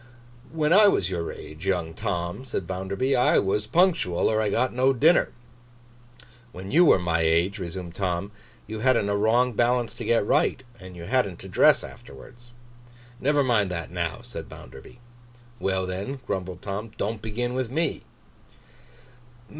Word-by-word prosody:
'When 155 0 +1
I 210 +2 +7
was 95 - +1
your 85 -2 -3
age, 75 +5 -10
young 85 -4 -1
Tom,' 90 +1 -3
said 120 -8 -4
Bounderby, 95 +9 -1
'I 125 - +3
was 105 +2 0
punctual, 165 - +2
or 110 0 +1
I 105 - 0
got 125 +5 0
no 130 +2 +3
dinner!' 160 +8 +3 1.2
'When 95 0 -8
you 170 +5 +6
were - - +6
my 85 -2 0
age,' 85 +5 +1
resumed 90 -1 -6
Tom, 95 +1 -2 0.3
'you 110 0 -6
hadn't 115 -4 +2
a 100 - +1
wrong 120 +4 +2
balance 120 +1 +1
to - - -8
get 115 -3 +2
right, 130 - +1 0.2
and 95 -1 -11
hadn't 85 0 -1
to - - -9
dress - - +4
afterwards.' 120 - -13 0.7
'Never 145 +1 +2
mind 110 -7 +2
that 85 -5 -5
now,' - - -3
said - - -9
Bounderby. 65 - -13 0.6
'Well, 95 -1 0
then,' 100 +9 -5
grumbled 90 -1 -4
Tom. 105 +3 -4
'Don't 105 +1 -3
begin 120 +3 -3
with 130 -2 -2
me. 160 +6 -1
105 Hz, 155 wpm, -25 LUFS, 90-125 Hz, 1.2 s, I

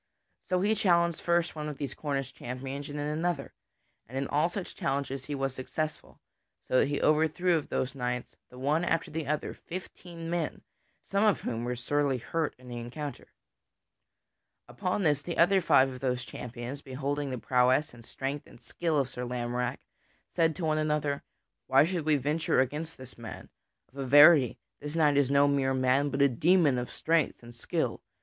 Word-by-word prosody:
So 180 0 +2
he 210 +3 +3
challenged 170 -6 +2
first 170 -1 +1
one 150 -1 -4
of 145 - -7
those 140 -3 -4
Cornish 135 -3 -3
champions 135 +4 -6
and 145 - -5
then 145 - -2
another, 165 -3 -2 0.5
and 130 +4 -7
in 135 0 -1
all 150 +4 +2
such 180 0 -5
challenges 135 -1 -2
he 145 - -3
was 135 -1 -1
successful, 155 +4 -5 0.5
so 130 - +3
that - - +3
he 145 0 -1
overthrew 160 +4 +3
of 155 - -2
those 130 0 -1
knights, 125 -2 -3
the 125 - -14
one 145 +6 +1
after 170 -2 0
the 155 -2 -3
other, 150 +1 -1
fifteen 175 -2 -8
men, 170 -2 -2 0.4
some 200 +1 0
of 210 -3 +3
whom 115 -1 -3
were 125 0 -2
sorely 140 +2 0
hurt 155 +6 -2
in 125 0 -16
the 120 -1 -6
encounter. 130 +3 -6 1.4
Upon 195 +1 -2
this, 150 -3 +2
the 170 +3 -5
other 190 +3 +5
five 135 -5 +5
of 130 -1 -8
those 125 -2 -1
champions, 125 +4 -7
beholding 140 +1 -3
the 130 - -3
prowess 125 +4 +2
and 120 -1 -13
strength 140 +5 -5
and - - -16
skill 165 +2 -2
of 135 -3 +2
Sir 125 -1 -6
Lamorack 125 0 -2 0.5
said 165 -3 +2
to 175 - -3
one 155 0 +1
another: 150 -2 0 0.5
"Why - - +6
should 170 -1 -2
we 155 - +5
venture 150 +2 +1
against 150 +5 -1
this 130 -2 -12
man? 115 -1 -8 0.4
Of 140 - -10
a 135 - -2
verity, 145 -2 +7 0.2
this 150 +2 -6
knight 150 -3 +4
is 140 -2 +3
no 140 +1 +5
mere 135 -2 +1
man, 130 +2 +2
but 140 0 +2
a - - +7
demon 150 0 +3
of 125 - -4
strength 160 -6 0
and 120 0 -11
skill. 115 - -2
145 Hz, 185 wpm, -29 LUFS, 130-160 Hz, 1.4 s, verity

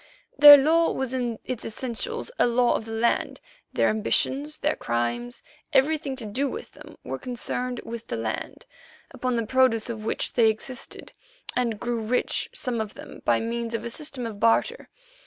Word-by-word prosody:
Their 290 0 +11
law 325 +4 +3
was 265 -1 -2
in 240 -3 -2
its 250 -3 -4
essentials 235 - -4
a - - +5
law 240 0 +3
of 220 - -3
the 225 - -8
land; 225 +1 0 0.3
their - - +2
ambitions, 270 +7 0
their 300 - 0
crimes, 120 +1 -3 0.3
everything 285 0 +2
to 250 -4 -8
do 260 +7 -1
with 450 - -7
them, - - -14
were - - -5
concerned 250 0 -4
with 235 0 -7
the - - -3
land, 110 0 -5 0.5
upon 255 -1 -2
the 230 -1 0
produce 245 -1 +2
of 220 -2 -7
which 220 - -1
they 230 -2 +5
existed 245 +4 -6 0.4
and 235 -4 0
grew 240 0 -2
rich, 230 +3 0
some 240 -3 -2
of 215 -1 -6
them, - - -11
by - - +3
means 230 0 -3
of - - -4
a 235 - -4
system 280 -3 -3
of 215 -3 -6
barter. 470 - +2
240 Hz, 175 wpm, -25 LUFS, 225-260 Hz, 0.5 s, Their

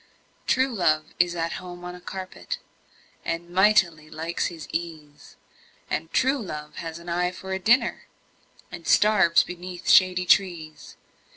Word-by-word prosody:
True 260 0 +2
love 155 -6 +1
is 175 0 +2
at 165 0 -2
home 180 -1 -9
on 180 - -6
a 180 - -11
carpet, 190 - -6 0.7
And 170 +1 -4
mightily 175 -5 +3
likes 165 +2 -2
his 165 -3 -8
ease 155 -4 -6 0.6
And 160 +1 -2
true 265 +2 +2
love 150 -6 -7
has 165 -1 -5
an 170 +1 -13
eye 175 +1 0
for 190 +1 -7
a 190 - -2
dinner, 235 +4 +2 0.6
And - - -9
starves 195 -6 +5
beneath 180 0 -8
shady 180 -1 +5
trees. 170 -5 0
175 Hz, 145 wpm, -25 LUFS, 165-190 Hz, 0.7 s, starves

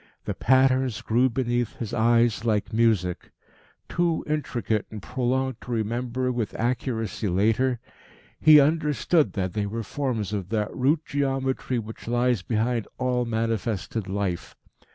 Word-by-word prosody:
The - - -2
patterns 130 -2 +3
grew 125 +4 +3
beneath 120 -1 -1
his 115 -4 -5
eyes 115 -1 +3
like 110 -3 0
music. 110 -6 +1 0.6
Too 170 -1 0
intricate 125 -8 -1
and 110 - -7
prolonged 130 +6 -1
to 125 - -8
remember 120 +3 -1
with 120 -4 -3
accuracy 115 -3 -1
later, 110 +7 +2 0.6
he 155 -1 +8
understood 150 +1 +2
that 95 -3 -2
they 105 -1 -1
were 115 +3 -4
forms 115 -5 -2
of 95 -3 -3
that 105 -2 -1
root 150 +5 +1
geometry 135 -3 -1
which 110 0 -7
lies 120 -2 +1
behind 115 +2 -1
all 125 -1 0
manifested 110 -3 -2
life. 95 -3 -3
120 Hz, 130 wpm, -25 LUFS, 110-130 Hz, 0.6 s, he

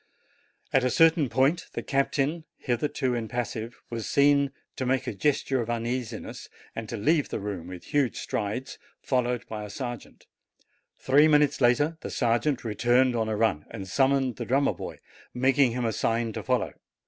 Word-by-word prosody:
At 135 - +4
a 125 - +2
certain 160 +1 +4
point 140 +8 +2
the - - -4
captain, 145 +3 0
hitherto 125 0 -1
impassive, 115 0 -4
was 115 -2 -4
seen 140 -1 +4 0.3
to - - -2
make 130 -1 +1
a - - -3
gesture 135 +2 +1
of 115 - -5
uneasiness, 120 0 -4 0.3
and 115 -1 -5
to 120 - -4
leave 150 +8 +2
the - - -3
room 100 -4 -5
with 90 -1 -8
huge 140 -4 0
strides, 110 +5 -3 0.2
followed 125 -2 0
by 105 -1 -5
a 105 - -7
sergeant. 120 +2 -7 0.7
Three 145 +4 +5
minutes 150 -2 +3
later 145 +7 +3
the - - -5
sergeant 120 +3 +1
returned 120 +3 +2
on 110 -1 0
a 110 - -1
run, 105 -9 +1
and 95 - -7
summoned 135 +2 +2
the 120 - -4
drummer 135 +5 +2
boy, - - -7 0.4
making 130 0 +3
him 125 -1 -1
a 115 - 0
sign 115 0 0
to - - -4
follow. - - 0
125 Hz, 170 wpm, -27 LUFS, 115-140 Hz, 0.7 s, Three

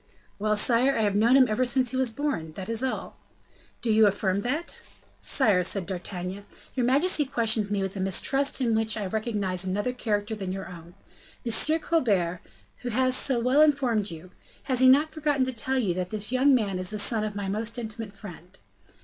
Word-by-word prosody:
"Well, 215 +1 0
sire! 250 +5 +4
I 220 - +1
have 205 -1 0
known 230 +5 +4
him 260 -2 +5
ever 215 +3 0
since 255 0 +1
he - - -5
was 260 -2 +2
born, 225 - -3
that 190 +5 -8
is 230 0 0
all." 260 - -4 0.7
"Do 230 - 0
you 215 0 +5
affirm 200 -1 -1
that?" 295 +10 -3 0.4
"Sire," 205 -9 +3
said 190 +1 0
D'Artagnan, 185 +1 -5 0.3
"your 250 -2 0
majesty 295 +5 +3
questions 225 -6 +1
me 205 -1 -1
with 195 0 -5
a - - -5
mistrust 270 +10 0
in 235 -3 +1
which 220 0 0
I 210 - -3
recognize 200 -3 -1
another 205 +6 -2
character 215 -3 -2
than 195 -4 -5
your 190 0 -6
own. 170 0 -12 0.5
M. 265 +8 +3
Colbert, 195 - 0 0.4
who 245 - -6
has 255 +2 +2
so 260 -2 +2
well 255 +5 +3
informed 260 -9 +2
you, 170 +2 -11 0.3
has 260 -3 0
he 260 0 +6
not 295 +4 +4
forgotten 295 -4 0
to 260 - -3
tell 260 +3 -2
you 205 -9 0
that 180 0 -4
this 215 +2 -4
young 265 +2 +4
man 200 -6 -1
is 185 0 -2
the 215 - -4
son 215 +1 0
of 210 -1 -4
my 200 -1 -4
most 220 +4 -2
intimate 220 -2 -6
friend?" 180 -3 -12
220 Hz, 200 wpm, -26 LUFS, 195-255 Hz, 0.7 s, he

